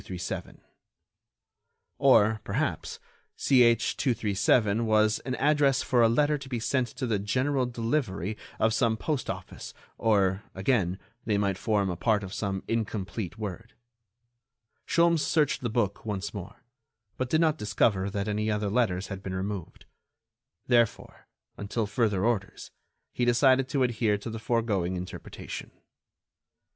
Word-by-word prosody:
Or, 110 Hz, -6 st, +5 dB
perhaps, -, -, -2 dB, 0.4 s
CH. 120 Hz, -3 st, +4 dB
237 110 Hz, -2 st, +2 dB
was 110 Hz, 0 st, +3 dB
an 130 Hz, -1 st, -4 dB
address 140 Hz, -2 st, +3 dB
for 125 Hz, -2 st, +2 dB
a 115 Hz, -, +6 dB
letter 145 Hz, +5 st, +2 dB
to 135 Hz, -1 st, -10 dB
be 120 Hz, -3 st, -2 dB
sent 125 Hz, +2 st, 0 dB
to 130 Hz, -, -2 dB
the 110 Hz, -4 st, 0 dB
"general 130 Hz, +6 st, 0 dB
delivery" 115 Hz, -, -2 dB, 0.2 s
of 110 Hz, 0 st, +2 dB
some 110 Hz, 0 st, +2 dB
postoffice, 130 Hz, -, -4 dB, 0.2 s
or, 100 Hz, -3 st, +2 dB
again, 95 Hz, -2 st, +1 dB, 0.3 s
they 105 Hz, -2 st, +1 dB
might 100 Hz, -2 st, 0 dB
form 100 Hz, -4 st, +1 dB
a -, -, -3 dB
part 105 Hz, +4 st, +1 dB
of 95 Hz, 0 st, -7 dB
some 95 Hz, -2 st, -3 dB
incomplete 110 Hz, -3 st, -3 dB
word. 110 Hz, +2 st, -6 dB, 1.1 s
Sholmes 170 Hz, -1 st, +3 dB
searched 150 Hz, -3 st, +1 dB
the 120 Hz, -, -2 dB
book 105 Hz, -3 st, -1 dB
once 100 Hz, -3 st, -4 dB
more, 100 Hz, -2 st, -9 dB, 0.5 s
but 130 Hz, -1 st, -3 dB
did 155 Hz, -, +3 dB
not 160 Hz, -2 st, +2 dB
discover 100 Hz, -2 st, +1 dB
that 100 Hz, +1 st, -3 dB
any 105 Hz, +1 st, -1 dB
other 105 Hz, -1 st, -1 dB
letters 100 Hz, -6 st, 0 dB
had 100 Hz, -2 st, -6 dB
been 95 Hz, -1 st, -5 dB
removed. 95 Hz, -1 st, -5 dB, 0.8 s
Therefore, 120 Hz, -3 st, 0 dB, 0.3 s
until 105 Hz, +2 st, -2 dB
further 105 Hz, -2 st, 0 dB
orders, 110 Hz, -5 st, -2 dB, 0.4 s
he 125 Hz, -, -1 dB
decided 130 Hz, +2 st, +4 dB
to 140 Hz, -2 st, +1 dB
adhere 115 Hz, -4 st, +1 dB
to 105 Hz, +3 st, -7 dB
the 110 Hz, -, -5 dB
foregoing 105 Hz, -6 st, 0 dB
interpretation. 90 Hz, 0 st, -7 dB
110 Hz, 135 wpm, -28 LUFS, 100-125 Hz, 1.1 s, a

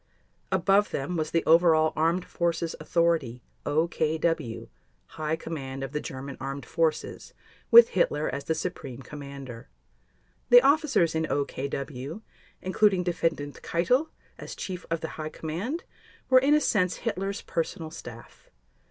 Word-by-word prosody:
Above 195 Hz, +2 st, +3 dB
them 140 Hz, +6 st, -3 dB
was 155 Hz, -2 st, -1 dB
the 165 Hz, -, 0 dB
overall 160 Hz, -1 st, +5 dB
Armed 165 Hz, +3 st, +1 dB
Forces 170 Hz, -1 st, -1 dB
authority, 155 Hz, -7 st, 0 dB, 0.2 s
OKW—High 155 Hz, -1 st, -2 dB
Command 135 Hz, -5 st, -6 dB
of 135 Hz, -, -5 dB
the 150 Hz, +1 st, -2 dB
German 135 Hz, 0 st, -7 dB
Armed 135 Hz, -1 st, -5 dB
Forces 160 Hz, 0 st, -2 dB, 0.3 s
with 235 Hz, 0 st, +9 dB
Hitler 155 Hz, -4 st, +1 dB
as 140 Hz, -, -4 dB
the 160 Hz, -, 0 dB
Supreme 135 Hz, -9 st, -5 dB
Commander. 140 Hz, -4 st, -9 dB, 0.8 s
The -, -, +9 dB
officers 285 Hz, -, +3 dB
in 160 Hz, 0 st, 0 dB
OKW, 140 Hz, -, -4 dB, 0.4 s
including 190 Hz, 0 st, +3 dB
Defendant 165 Hz, -4 st, -2 dB
Keitel 245 Hz, -, +1 dB, 0.3 s
as -, -, -7 dB
Chief 180 Hz, -2 st, -6 dB
of 165 Hz, -1 st, -1 dB
the 160 Hz, -, -3 dB
High 155 Hz, -, -3 dB
Command, 190 Hz, -, -4 dB, 0.5 s
were 260 Hz, -, +8 dB
in 280 Hz, +3 st, +4 dB
a 300 Hz, -, +3 dB
sense 185 Hz, -9 st, +1 dB
Hitler's 195 Hz, -2 st, -2 dB
personal 165 Hz, -1 st, -3 dB
staff. -, -, -11 dB
160 Hz, 130 wpm, -27 LUFS, 145-180 Hz, 0.8 s, with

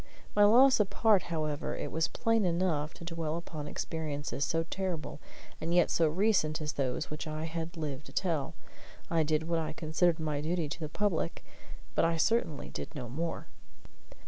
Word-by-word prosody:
My 205 Hz, 0 st, +7 dB
loss 255 Hz, +5 st, +7 dB
apart, 210 Hz, 0 st, +4 dB
however, 155 Hz, -3 st, -2 dB
it -, -, -4 dB
was 160 Hz, +1 st, +1 dB
plain 225 Hz, -2 st, +1 dB
enough 170 Hz, -4 st, +1 dB
to 170 Hz, -, -10 dB
dwell 165 Hz, -2 st, -2 dB
upon 155 Hz, -3 st, -6 dB
experiences 145 Hz, -3 st, -3 dB
so 165 Hz, +2 st, +1 dB
terrible 165 Hz, -4 st, -4 dB, 0.4 s
and 170 Hz, +2 st, 0 dB
yet 175 Hz, -, +4 dB
so 165 Hz, -, +4 dB
recent 165 Hz, -2 st, +2 dB
as 150 Hz, -2 st, -3 dB
those 135 Hz, +3 st, -2 dB
which 150 Hz, +1 st, -4 dB
I 155 Hz, 0 st, -3 dB
had 165 Hz, +1 st, -4 dB
lived 150 Hz, -3 st, -4 dB
to -, -, -11 dB
tell. 165 Hz, -7 st, -1 dB, 0.6 s
I 165 Hz, -1 st, +3 dB
did 155 Hz, +1 st, +1 dB
what 170 Hz, -1 st, +1 dB
I 160 Hz, -, -3 dB
considered 160 Hz, +2 st, +1 dB
my 150 Hz, -2 st, -1 dB
duty 165 Hz, +1 st, -1 dB
to 145 Hz, -, -5 dB
the 155 Hz, -2 st, -4 dB
public, 170 Hz, -2 st, -1 dB, 0.5 s
but -, -, +2 dB
I 165 Hz, 0 st, +2 dB
certainly 165 Hz, -, +1 dB
did -, -, -6 dB
no 125 Hz, -5 st, -5 dB
more. 165 Hz, +7 st, -3 dB
160 Hz, 175 wpm, -31 LUFS, 155-175 Hz, 0.6 s, My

